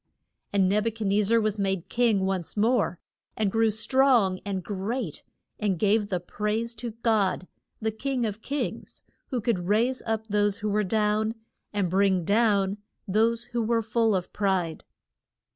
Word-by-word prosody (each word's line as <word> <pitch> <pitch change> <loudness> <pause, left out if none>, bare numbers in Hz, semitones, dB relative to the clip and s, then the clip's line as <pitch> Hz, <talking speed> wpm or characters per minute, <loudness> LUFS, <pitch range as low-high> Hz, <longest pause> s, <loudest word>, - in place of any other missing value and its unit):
And 195 -2 +3
Neb 210 +3 +1
u - - +1
chad 220 -1 -5
nez 200 +1 +2
zar 230 +1 +4
was 215 -1 -1
made 195 -3 -1
king 225 -5 +2
once 190 0 -2
more, 225 -4 +2 0.4
and 210 -3 +1
grew 225 +1 +3
strong 220 -3 +3
and 195 -2 -3
great, 205 - -3 0.4
and 200 -4 0
gave 205 +3 +2
the 185 -3 0
praise 210 +6 -2
to 235 +2 -4
God; 205 -5 +1 0.3
the 220 0 -1
King 255 +2 -2
of 210 0 -4
kings, 285 +4 -4 0.2
who 255 - -2
could 205 -6 -1
raise 235 +6 +2
up 220 -1 -1
those 205 -1 +1
who 215 -1 -2
were 210 +1 +2
down, 215 +2 +1 0.4
and 205 -3 0
bring 190 -1 +2
down 205 -1 +2 0.3
those 225 +4 +2
who 240 - +1
were 230 0 +1
full 225 -1 +2
of 180 -1 -3
pride. 190 -5 -1
210 Hz, 165 wpm, -26 LUFS, 195-225 Hz, 0.4 s, zar